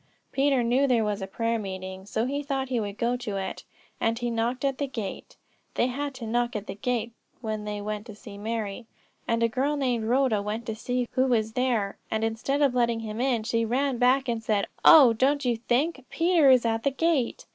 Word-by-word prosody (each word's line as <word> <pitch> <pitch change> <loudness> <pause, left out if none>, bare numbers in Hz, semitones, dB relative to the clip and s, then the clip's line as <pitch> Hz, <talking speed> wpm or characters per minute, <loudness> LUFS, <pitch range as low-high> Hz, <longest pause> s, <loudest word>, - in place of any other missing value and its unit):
Peter 275 -2 +2
knew 255 +4 +2
there 240 -4 +3
was 210 -1 -2
a 190 - -4
prayer 230 +3 -1
meeting, 190 -1 -6
so 220 +2 -1
he 280 +3 -2
thought 270 -2 -2
he 250 -2 0
would 205 -1 -4
go 240 +1 +1
to 225 -5 -4
it; 190 -1 -5 0.4
and 225 0 +1
he 240 0 -2
knocked 235 +3 -1
at 270 -1 -1
the 285 - -1
gate 220 -7 -6 0.4
(they - - +2
had 275 +2 -3
to 250 -3 -7
knock 240 +2 0
at 210 -1 -3
the 190 - -5
gate 230 +2 -2 0.3
when 215 -2 -4
they 210 0 -4
went 210 +2 -5
to 215 - -9
see 210 -1 -11
Mary), 220 +1 -4 0.4
and 230 0 +1
a - - +5
girl 270 +6 -1
named 245 -5 0
Rhoda 245 -3 +2
went 215 +3 -4
to 220 - -4
see 245 +2 -2
who 260 +1 +2
was 220 -3 +1
there; 235 -6 0
and 220 0 -1
instead 230 +6 0
of 275 -3 +3
letting 235 -2 +1
him 220 +1 -4
in, 250 -4 +1
she 230 0 0
ran 255 +2 0
back 260 +2 +3
and 230 -2 -1
said: 210 -2 +1 0.2
'Oh, 280 -8 +9
don't 275 +4 +1
you 240 -1 +2
think, 265 +5 0
Peter 335 -4 +4
is 255 -2 +5
at 225 0 0
the 280 - +2
gate.' 280 -2 0
235 Hz, 220 wpm, -26 LUFS, 220-260 Hz, 0.4 s, Oh